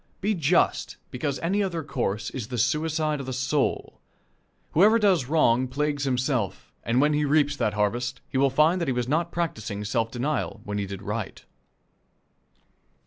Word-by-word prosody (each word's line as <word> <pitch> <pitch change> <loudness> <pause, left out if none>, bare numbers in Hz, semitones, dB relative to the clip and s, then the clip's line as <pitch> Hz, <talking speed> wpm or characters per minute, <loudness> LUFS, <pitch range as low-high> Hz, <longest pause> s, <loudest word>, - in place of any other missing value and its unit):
Be 210 +2 +1
just, 170 -1 +1
because 135 +2 -2
any 195 +5 +1
other 170 -5 -2
course 115 -7 -2
is 120 -5 -5
the 125 0 -4
suicide 150 +4 0
of 135 - -6
the 130 - -3
soul. 135 +2 -1 0.7
Whoever 210 +7 +5
does 190 - +3
wrong 130 -5 +3
plagues 145 +2 -1
himself, 130 -5 -1
and 120 +2 +1
when 150 +2 +3
he 150 0 +1
reaps 145 0 +2
that 105 - 0
harvest, 120 +5 -1
he 130 - -1
will 140 0 +4
find 155 +7 +3
that 170 - -1
he 130 - +1
was 125 -1 -1
not 165 +5 0
practicing 110 -12 -3
self 115 +2 0
denial 125 0 -2
when 105 0 -3
he 100 - -2
did 100 0 -7
right. 105 +1 -5
135 Hz, 170 wpm, -26 LUFS, 120-155 Hz, 0.7 s, Whoever